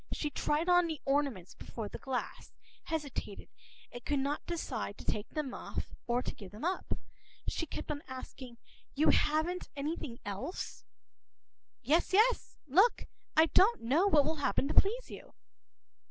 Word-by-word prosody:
She 300 Hz, -, -2 dB
tried 300 Hz, +4 st, 0 dB
on 355 Hz, -1 st, +5 dB
the 315 Hz, -3 st, -3 dB
ornaments 275 Hz, -10 st, 0 dB
before 225 Hz, -3 st, -6 dB
the -, -, -8 dB
glass, 265 Hz, -2 st, -4 dB, 0.3 s
hesitated, 290 Hz, -10 st, -4 dB, 0.4 s
and 245 Hz, -1 st, -8 dB
could 290 Hz, -, 0 dB
not 280 Hz, +2 st, -1 dB
decide 250 Hz, -11 st, -3 dB
to -, -, -11 dB
take 210 Hz, +1 st, -1 dB
them 290 Hz, -5 st, -3 dB
off -, -, -5 dB, 0.2 s
and 245 Hz, +1 st, +1 dB
to -, -, -2 dB
give 195 Hz, -3 st, -10 dB
them 215 Hz, +8 st, -6 dB
up. 370 Hz, +2 st, -1 dB, 0.5 s
She 330 Hz, -, -1 dB
kept -, -, -5 dB
on 290 Hz, -1 st, -3 dB
asking:— 255 Hz, -1 st, -8 dB, 0.4 s
“You 300 Hz, +3 st, +5 dB
haven’t 315 Hz, +4 st, +1 dB
anything 285 Hz, -4 st, -3 dB
else?” 205 Hz, -, -5 dB, 1.0 s
“Yes, 315 Hz, +9 st, +2 dB
yes. 455 Hz, +5 st, +3 dB
Look. 375 Hz, -, +4 dB, 0.3 s
I 315 Hz, -, +8 dB
do 325 Hz, -, +5 dB
not 445 Hz, +5 st, +4 dB
know 285 Hz, +12 st, +3 dB
what 300 Hz, -7 st, +5 dB
will 315 Hz, +1 st, 0 dB
happen 280 Hz, -1 st, +1 dB
to -, -, 0 dB
please 465 Hz, +5 st, +3 dB
you. -, -, -10 dB
295 Hz, 160 wpm, -33 LUFS, 255-335 Hz, 1.0 s, I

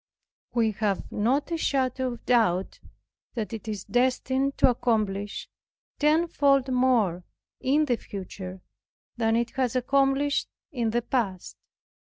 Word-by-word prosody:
We 225 Hz, -2 st, +3 dB
have 205 Hz, -3 st, -1 dB
not 260 Hz, +10 st, 0 dB
a 335 Hz, -, 0 dB
shadow 260 Hz, -4 st, 0 dB
of 235 Hz, -, -12 dB
doubt 205 Hz, -7 st, +2 dB, 0.6 s
that 225 Hz, -1 st, -3 dB
it 225 Hz, -1 st, -7 dB
is 210 Hz, -3 st, -4 dB
destined 260 Hz, +2 st, +1 dB
to -, -, +5 dB
accomplish 210 Hz, -4 st, -1 dB, 0.5 s
tenfold 290 Hz, -4 st, +3 dB
more 235 Hz, -9 st, +2 dB, 0.4 s
in 295 Hz, +4 st, +2 dB
the 245 Hz, -5 st, +1 dB
future 185 Hz, -2 st, -8 dB, 0.6 s
than 225 Hz, -1 st, +2 dB
it 235 Hz, 0 st, 0 dB
has 255 Hz, -2 st, -1 dB
accomplished 275 Hz, +2 st, +2 dB, 0.2 s
in 240 Hz, -6 st, -1 dB
the 240 Hz, +2 st, 0 dB
past. 205 Hz, -8 st, -2 dB
245 Hz, 125 wpm, -26 LUFS, 215-270 Hz, 0.6 s, to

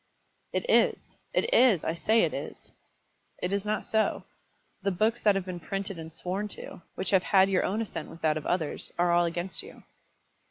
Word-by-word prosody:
"It -, -, -2 dB
is -, -, +2 dB
it 475 Hz, -, +1 dB
is; 240 Hz, -, +5 dB
I 160 Hz, -, 0 dB
say 220 Hz, +6 st, +3 dB
it -, -, +1 dB
is." -, -, -7 dB, 0.7 s
"It 180 Hz, +2 st, -2 dB
is 200 Hz, +1 st, -1 dB
not 215 Hz, 0 st, -1 dB
so. 220 Hz, 0 st, +1 dB, 0.6 s
The 200 Hz, -, +1 dB
books 215 Hz, +6 st, +1 dB
that 205 Hz, -2 st, +4 dB
have 195 Hz, -2 st, -1 dB
been 180 Hz, -2 st, -5 dB
printed 195 Hz, +1 st, -4 dB
and 160 Hz, 0 st, -8 dB
sworn 185 Hz, +5 st, -3 dB
to, -, -, -9 dB
which 190 Hz, -, -2 dB
have 190 Hz, -2 st, +5 dB
had 195 Hz, +1 st, +4 dB
your 185 Hz, -, +3 dB
own 215 Hz, +4 st, 0 dB
assent 180 Hz, -7 st, -6 dB
with 165 Hz, -, -12 dB
that 155 Hz, -1 st, +3 dB
of 155 Hz, -, -4 dB
others, 165 Hz, -4 st, -2 dB
are 175 Hz, 0 st, +3 dB
all 175 Hz, 0 st, +4 dB
against 175 Hz, +2 st, -2 dB
you." 435 Hz, +4 st, -13 dB
190 Hz, 200 wpm, -28 LUFS, 175-210 Hz, 0.7 s, is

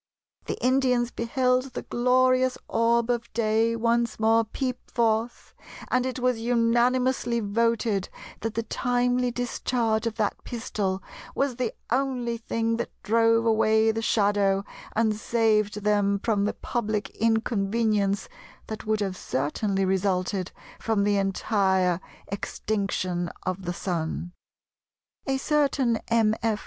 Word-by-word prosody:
The -, -, -3 dB
Indians 250 Hz, -2 st, +2 dB
beheld 255 Hz, +1 st, 0 dB
the -, -, -4 dB
glorious 255 Hz, +1 st, +2 dB
orb 230 Hz, +1 st, +2 dB
of 235 Hz, -1 st, -3 dB
day 225 Hz, 0 st, +2 dB
once 235 Hz, 0 st, 0 dB
more 225 Hz, +1 st, +4 dB
peep 250 Hz, +3 st, -4 dB
forth, 230 Hz, 0 st, -1 dB, 0.4 s
and 255 Hz, 0 st, +2 dB
it 260 Hz, -, -4 dB
was 250 Hz, -2 st, +1 dB
unanimously 240 Hz, +1 st, +2 dB
voted 220 Hz, -1 st, 0 dB, 0.3 s
that 225 Hz, 0 st, -4 dB
the 230 Hz, -, -1 dB
timely 245 Hz, +1 st, 0 dB
discharge 235 Hz, -2 st, -1 dB
of 225 Hz, -, -3 dB
that 210 Hz, -3 st, -2 dB
pistol 205 Hz, -6 st, -3 dB, 0.3 s
was 275 Hz, -3 st, 0 dB
the 250 Hz, -3 st, -1 dB, 0.2 s
only 250 Hz, -3 st, 0 dB
thing 230 Hz, 0 st, -1 dB
that 235 Hz, -, -3 dB
drove 230 Hz, +1 st, +3 dB
away 220 Hz, 0 st, +3 dB
the 225 Hz, +1 st, -3 dB
shadow 200 Hz, -2 st, +2 dB, 0.3 s
and 220 Hz, -1 st, +2 dB
saved 215 Hz, -2 st, +1 dB
them 205 Hz, -1 st, +2 dB
from 205 Hz, -1 st, 0 dB
the 210 Hz, -, 0 dB
public 215 Hz, -3 st, -2 dB
inconvenience 215 Hz, -2 st, +1 dB, 0.4 s
that 220 Hz, -1 st, -7 dB
would 215 Hz, -1 st, +1 dB
have 195 Hz, -2 st, -1 dB
certainly 190 Hz, +8 st, -1 dB
resulted 190 Hz, 0 st, 0 dB, 0.3 s
from 220 Hz, -3 st, +1 dB
the 205 Hz, 0 st, +2 dB
entire 190 Hz, -2 st, +1 dB, 0.3 s
extinction 190 Hz, -3 st, -2 dB
of 185 Hz, 0 st, -3 dB
the 175 Hz, -, -2 dB
Sun." 175 Hz, -1 st, -3 dB, 1.0 s
A 270 Hz, 0 st, +1 dB
certain 275 Hz, -5 st, +1 dB
Mr. 225 Hz, -2 st, +4 dB
F. 225 Hz, -2 st, 0 dB
225 Hz, 125 wpm, -26 LUFS, 205-240 Hz, 1.0 s, more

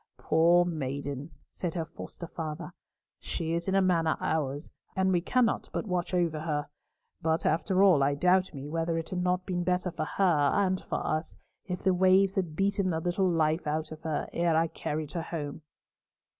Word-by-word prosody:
"Poor 170 Hz, +3 st, +4 dB
maiden!" 140 Hz, -2 st, -4 dB, 0.2 s
said 175 Hz, -2 st, -4 dB
her 165 Hz, -2 st, -1 dB
foster 170 Hz, -, -8 dB
father, 155 Hz, -2 st, -6 dB, 0.5 s
"she 165 Hz, 0 st, -3 dB
is 170 Hz, +2 st, -2 dB
in 190 Hz, -, +1 dB
a 195 Hz, -, +4 dB
manner 165 Hz, -4 st, +2 dB
ours, 145 Hz, -1 st, -2 dB, 0.2 s
and 190 Hz, 0 st, +2 dB
we 175 Hz, -2 st, +2 dB
cannot 240 Hz, +5 st, +1 dB
but -, -, -2 dB
watch 180 Hz, -3 st, -2 dB
over 170 Hz, -4 st, +1 dB
her; 150 Hz, -2 st, -2 dB, 0.5 s
but 160 Hz, 0 st, 0 dB
after 185 Hz, +4 st, +2 dB
all, 180 Hz, -8 st, +6 dB
I 140 Hz, +1 st, +2 dB
doubt 180 Hz, +4 st, +3 dB
me 140 Hz, 0 st, -7 dB
whether 165 Hz, +2 st, -1 dB
it 165 Hz, -, -4 dB
had 180 Hz, -1 st, -2 dB
not 180 Hz, 0 st, 0 dB
been 180 Hz, -2 st, -1 dB
better 180 Hz, 0 st, 0 dB
for -, -, -3 dB
her 160 Hz, -7 st, +2 dB
and 190 Hz, -2 st, +1 dB
for -, -, -3 dB
us, 155 Hz, +1 st, -2 dB, 0.3 s
if 180 Hz, -2 st, -5 dB
the 190 Hz, -, +4 dB
waves 190 Hz, +1 st, +4 dB
had 175 Hz, -6 st, -2 dB
beaten 195 Hz, +1 st, +1 dB
the 160 Hz, -2 st, 0 dB
little 180 Hz, +3 st, +1 dB
life 160 Hz, -1 st, +1 dB
out 155 Hz, +1 st, -2 dB
of 155 Hz, 0 st, -8 dB
her 160 Hz, -2 st, -2 dB
ere 170 Hz, -2 st, +2 dB
I 165 Hz, 0 st, +2 dB
carried 150 Hz, -1 st, -4 dB
her 170 Hz, -, -2 dB
home." 155 Hz, -3 st, -5 dB
170 Hz, 190 wpm, -29 LUFS, 155-185 Hz, 0.5 s, all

